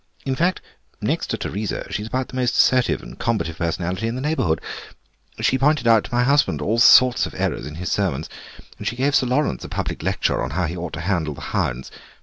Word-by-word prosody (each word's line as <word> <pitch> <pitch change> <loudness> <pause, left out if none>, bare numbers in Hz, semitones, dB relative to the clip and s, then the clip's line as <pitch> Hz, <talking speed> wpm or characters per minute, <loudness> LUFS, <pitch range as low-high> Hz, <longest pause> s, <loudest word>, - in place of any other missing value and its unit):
In 135 -1 0
fact, 180 +5 +1 0.4
next - - -1
to - - -2
Teresa, 105 +3 -3
she's 105 +1 -3
about 130 +2 -2
the - - -9
most 125 -2 0
assertive 125 -1 +3
and - - -11
combative 85 -8 -1
personality 90 +5 -2
in 115 - -2
the 130 - -4
neighbourhood. 130 - 0 0.8
She's 130 - +2
pointed 145 -2 +2
out 115 -2 +5
to 120 - -5
my 120 - +3
husband 140 - +2
all 105 +10 0
sorts 125 +1 +6
of - - -11
errors 65 - -2
in 75 - -8
his 90 +1 -4
sermons, 85 -7 -1 0.5
and - - -5
she 120 - -1
gave 135 +3 +1
Sir 130 -3 +3
Laurence 135 +5 0
a - - -7
public - - -3
lecture - - 0
on 60 - -2
how 90 - +1
he 85 +3 -4
ought 90 -1 -5
to 85 - -4
handle 85 -5 -1
the - - -11
hounds. 60 +2 -1
115 Hz, 220 wpm, -22 LUFS, 85-130 Hz, 0.8 s, sorts